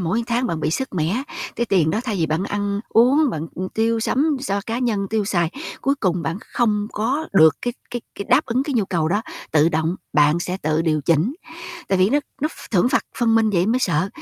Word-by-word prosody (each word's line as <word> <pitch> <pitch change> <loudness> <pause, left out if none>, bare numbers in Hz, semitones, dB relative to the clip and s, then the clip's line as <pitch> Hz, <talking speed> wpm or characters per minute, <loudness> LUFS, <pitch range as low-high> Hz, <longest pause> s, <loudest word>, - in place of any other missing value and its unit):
mỗi 185 +7 0
tháng 245 +1 0
bạn 165 -8 -3
bị 155 - 0
sứt 265 +8 -2
mẻ, 180 - 0 0.3
cái 235 - 0
tiền 180 -7 +2
đó 215 - 0
thay 220 -5 -2
vì 165 -3 +1
bạn 160 +4 -1
ăn 205 0 -2
uống, 265 +5 +4
bạn, 160 -4 -4
ưm, 185 +1 -4
tiêu 225 +2 0
sắm 285 +6 +1
so 200 -7 -1
cá 230 +1 -2
nhân 220 -6 0
tiêu 220 -1 +1
xài, 175 -5 0 0.3
cuối 275 +1 +1
cùng 180 -9 -1
bạn 165 +5 -3
không 210 -3 +1
có 270 +9 -1
được 160 -6 +6
cái 245 - -1 0.2
cái 240 - -3
cái 200 - -5
đáp 255 +5 +4
ứng 250 +1 +1
cái 280 -1 -3
nhu 220 -4 +2
cầu 170 -4 0
đó, 205 +6 0 0.3
tự 155 +1 +4
động, 160 +2 -1 0.2
bạn 150 +2 +4
sẽ 180 +1 -3
tự 155 +1 +1
điều 155 -2 +1
chỉnh. 165 - +1 0.5
Tại 190 - +2
vì 185 +3 +4
nó 290 - +4 0.2
nó 305 - +1
ph - - -13
thưởng 195 +2 +3
phạt - - +1
phân 230 -2 +3
minh 220 -1 +3
vậy 180 -1 +2
mới 235 +3 +2
sợ, 180 -5 +1
200 Hz, 240 wpm, -21 LUFS, 170-240 Hz, 0.5 s, được